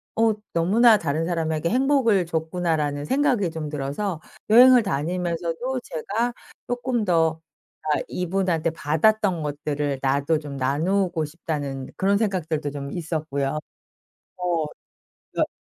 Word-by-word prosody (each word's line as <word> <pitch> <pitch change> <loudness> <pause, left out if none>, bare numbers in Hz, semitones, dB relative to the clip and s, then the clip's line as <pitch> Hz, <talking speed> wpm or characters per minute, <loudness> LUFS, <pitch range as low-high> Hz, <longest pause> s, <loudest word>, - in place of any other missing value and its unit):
어 225 -1 +3 0.2
너무나 215 +7 +5
다른 160 -2 -1
사람에게 165 -1 -1
행복을 250 -6 +3
줬구나.'라는 160 -3 -1
생각이 250 - +1
좀 160 -2 -5
들어서 150 +5 -3 0.3
여행을 245 +2 +8
다니면서도 175 - -2
제가 225 +9 -2 0.3
쪼끔 245 -2 -1
더 160 -3 +2 0.4
'아 155 -1 +1
이분한테 180 -2 0
받았던 170 +4 +1
것들을 145 -1 -2
나도 140 +3 +1
좀 145 -2 -7
나누고 165 +5 0
싶다.'는 145 -4 -5
그런 200 +1 +2
생각들도 165 -8 -1
좀 140 -1 -6
있었고요. 155 -4 -2 0.8
어 175 -3 0 0.7
그러니까 - - 0
165 Hz, 285 characters per minute, -24 LUFS, 150-200 Hz, 0.8 s, 여행을